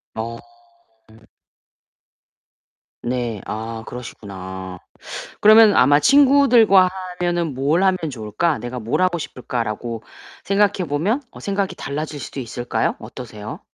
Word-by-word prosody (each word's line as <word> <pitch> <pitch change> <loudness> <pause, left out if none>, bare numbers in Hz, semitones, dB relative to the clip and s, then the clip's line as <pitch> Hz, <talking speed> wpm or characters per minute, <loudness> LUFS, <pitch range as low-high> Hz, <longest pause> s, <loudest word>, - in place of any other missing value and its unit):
어. 115 +1 -4 2.7
네. 120 -4 -2
아 110 +1 -5
그러시구나. 95 -6 -8 0.6
그러면 215 0 +8
아마 145 +3 +5
'친구들과 255 - +6 0.3
하면은 175 -3 0
뭘 145 +8 +1
하면 190 -1 +3
좋을까? 125 +7 -1
내가 120 +1 -6
뭘 115 +10 -1
하고 180 -2 +2
싶을까?'라고 115 -4 -4 0.4
생각해 200 -3 +1
보면 185 - 0
어 - - -13
생각이 200 -1 -2
달라질 150 +1 -4
수도 135 - -6
있을까요? 120 0 -2
어떠세요? 110 -3 -9
140 Hz, 255 characters per minute, -21 LUFS, 115-190 Hz, 2.7 s, 그러면